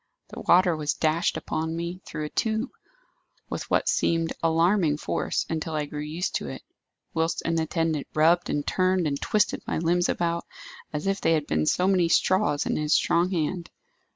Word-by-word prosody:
The - - -9
water 180 -1 +4
was 150 -1 -1
dashed 160 +2 +1
upon 160 +1 -3
me, 170 +2 -4
through 155 - -4
a - - -5
tube, 220 - -1 0.8
with - - -4
what - - +1
seemed 165 -1 +1
alarming 165 -1 +2
force - - -2
until 160 0 -3
I 150 -1 -1
grew 150 0 -7
used 160 +4 -3
to - - -7
it; - - -7 0.5
whilst 165 +1 -1
an 165 0 0
attendant 160 -2 -1
rubbed 165 +3 +3
and 145 -1 -1
turned 185 -1 +1
and 140 -2 -2
twisted 210 -2 +1
my - - -1
limbs 175 +2 +1
about, 170 0 -1 0.4
as 150 +2 -4
if 195 0 0
they 165 - +3
had 155 -2 +1
been 75 - 0
so 180 - +2
many 185 -3 +3
straws 165 -4 +2
in - - -1
his 150 0 +2
strong 175 +2 +2
hand. 170 0 -2
165 Hz, 180 wpm, -26 LUFS, 155-180 Hz, 0.8 s, water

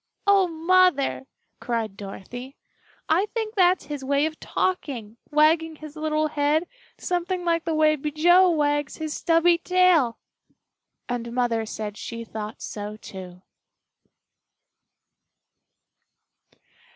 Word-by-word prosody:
"Oh, 400 -2 +5
Mother!" 330 -5 +2 0.3
cried 230 -5 -3
Dorothy, 240 +6 -9 0.5
"I 355 +6 +2
think 440 -1 -4
that's 365 -3 +3
his 290 -2 -6
way 280 +2 +2
of 315 0 -4
talking 245 - -3
wagging 315 +2 +3
his 305 0 -11
little 310 0 0
head 300 +2 +1 0.3
something 355 0 -2
like 335 -1 +1
the 325 -1 -1
way 310 0 +4
Bijou 320 +6 +4
wags 290 -3 0
his 315 -1 -4
stubby 335 +1 +3
tail!" 355 -10 +3 0.9
And 235 -1 -4
Mother 235 -2 0
said 210 -1 -5
she 230 0 -6
thought 215 -1 -7
so, 210 0 -6
too. 185 -3 -10
305 Hz, 110 wpm, -24 LUFS, 240-340 Hz, 0.9 s, Oh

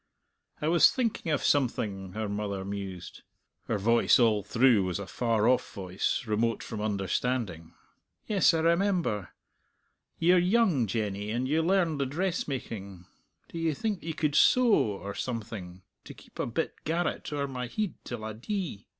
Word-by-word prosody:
"I - - +1
was 170 +1 +6
thinking 230 -9 -1
of 150 - 0
something," 100 -9 0
her 110 +1 -3
mother 100 -2 -3
mused. 95 -3 -6 0.5
Her 110 - 0
voice 115 +4 +4
all 110 -4 +3
through 115 +1 +3
was 90 -2 -2
a 100 - -5
far 115 +2 0
off 125 0 +2
voice, 95 -1 -2
remote 115 +1 0
from 110 - -6
understanding. 100 -3 -2 0.5
"Yes, 205 -3 +4
I 160 - +1
remember. 170 - +1 0.9
Ye're 175 +2 +4
young, 180 - +3
Jenny, 105 -1 -2
and 120 +4 -1
you 155 +4 +2
learned 170 -3 +1
the 135 - 0
dressmaking; 130 - -4 0.4
do 165 - -6
ye 165 -2 0
think 205 +1 -2
ye 160 0 -4
could 150 -2 -1
sew, 245 - +5
or 100 - 0
something, 105 -7 -6 0.2
to - - -10
keep - - -17
a - - 0
bit 140 +8 -3
garret 165 +1 -2
owre 140 -1 -1
my 125 -2 -4
heid 210 - -2
till 120 -3 -6
I 110 - -4
dee? 160 - -5
120 Hz, 160 wpm, -29 LUFS, 100-165 Hz, 0.9 s, was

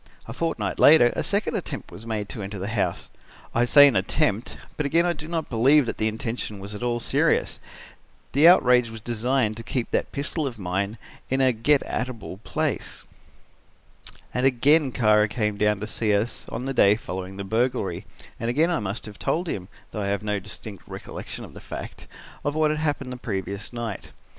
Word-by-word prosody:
A - - -6
fortnight 165 -1 -2
later 140 -5 +7
a - - 0
second 205 +3 0
attempt 155 -8 -5
was 110 +2 -10
made 105 -2 -2
to 110 - -5
enter 100 +1 -5
the 100 +2 -4
house. 110 -2 -2 0.4
I 120 - +3
say 145 +3 +8
an 135 - +2
attempt, 105 +3 0 0.2
but 150 - -1
again 165 +4 +3
I 175 - +2
do 150 -1 -9
not 165 -2 -2
believe 135 +4 +4
that - - -4
the 110 - +2
intention 110 -1 -4
was 100 +2 -7
at 105 - -7
all 120 -1 0
serious. - - +1 0.7
The 145 +4 +6
outrage 125 -9 +6
was 115 0 -8
designed 120 0 0
to - - -6
keep 120 0 -3
that - - 0
pistol 145 +2 -2
of 120 -4 -6
mine 100 +3 -2 0.3
in 130 - +1
a 130 -1 +4
get 135 +6 +3
at 125 +1 -2
able 110 -6 -8
place. 100 -1 -3 1.3
"And 125 - 0
again 135 +3 +4
Kara 110 -3 +4
came 105 -1 -1
down 105 0 +2
to - - -2
see 110 -1 0
us 110 +4 -2
on 125 +3 -4
the 135 - -2
day 100 -5 +5
following 95 -2 -6
the 100 - -4
burglary, 110 -3 -1 0.3
and 115 - -2
again 155 +8 +2
I 170 - +1
must 100 +2 -4
have 105 -1 -10
told 175 +2 -1
him, 95 - -4 0.2
though 105 - -4
I 100 - -1
have 100 0 -1
no 105 -1 -1
distinct 100 0 -9
recollection - - -7
of - - -14
the - - -11
fact, - - -8 0.4
of 145 +1 -1
what 155 -1 +3
had 155 - -2
happened 145 -4 -2
the - - -7
previous 100 -3 -4
night. 115 -4 -5
115 Hz, 200 wpm, -25 LUFS, 105-140 Hz, 1.3 s, say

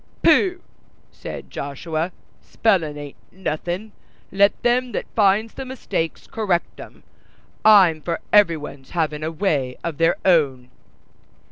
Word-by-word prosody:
"Pooh!" 365 -3 +4 0.5
said - - -9
Joshua, 155 +5 -4 0.3
"spellin' 170 -9 0
ain't 145 -1 -9
nothin'; 185 +3 -4 0.4
let 200 +1 +3
them 245 +1 +1
that - - -2
finds 215 +1 +3
the 270 - -6
mistakes 255 -10 -4
correct 200 -8 -2
'em. - - -12 0.6
I'm 190 -7 +6
for 170 +1 -3
every 200 -6 +5
one's 140 -3 -10
havin' 155 -2 0
a 155 - -1
way 150 -7 -1
of 165 -3 -4
their 165 +1 +3
own." 135 -9 +2
170 Hz, 125 wpm, -22 LUFS, 150-210 Hz, 0.6 s, I'm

